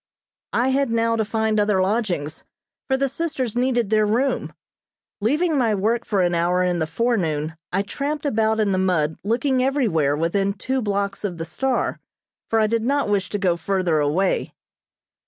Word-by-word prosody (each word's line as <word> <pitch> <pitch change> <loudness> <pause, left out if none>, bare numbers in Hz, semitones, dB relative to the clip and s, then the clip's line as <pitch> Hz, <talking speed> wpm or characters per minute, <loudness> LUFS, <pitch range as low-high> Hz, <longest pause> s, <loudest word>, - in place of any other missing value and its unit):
I 245 +3 +2
had 275 0 +1
now 230 0 +1
to 220 - +1
find 220 0 0
other 205 -2 +2
lodgings, 185 -7 -1 0.4
for 265 - +1
the 275 +1 +1
sisters 270 -5 -3
needed 245 -3 +1
their 215 -1 +3
room. 250 +6 0 0.7
Leaving 300 - +1
my 225 -4 +2
work 225 +4 0
for 200 -4 +1
an 175 0 +1
hour 175 +2 +2
in 180 -1 0
the 160 - -1
forenoon 160 -6 -1 0.2
I 195 +2 +1
tramped 290 +8 -4
about 220 -4 +1
in 210 -2 +2
the 185 - +1
mud 160 -5 0
looking 255 +5 +1
everywhere 195 - +1
within 195 +5 0
two 260 +6 -2
blocks 200 -2 -2
of 185 -4 -3
the 165 - -4
"Star," 255 +9 -1 0.5
for 225 - +2
I 215 - +4
did 230 +1 0
not 275 0 0
wish 200 -2 0
to 205 - -2
go 185 -4 +1
further 180 -3 0
away. 155 +7 0
210 Hz, 175 wpm, -22 LUFS, 180-245 Hz, 0.7 s, I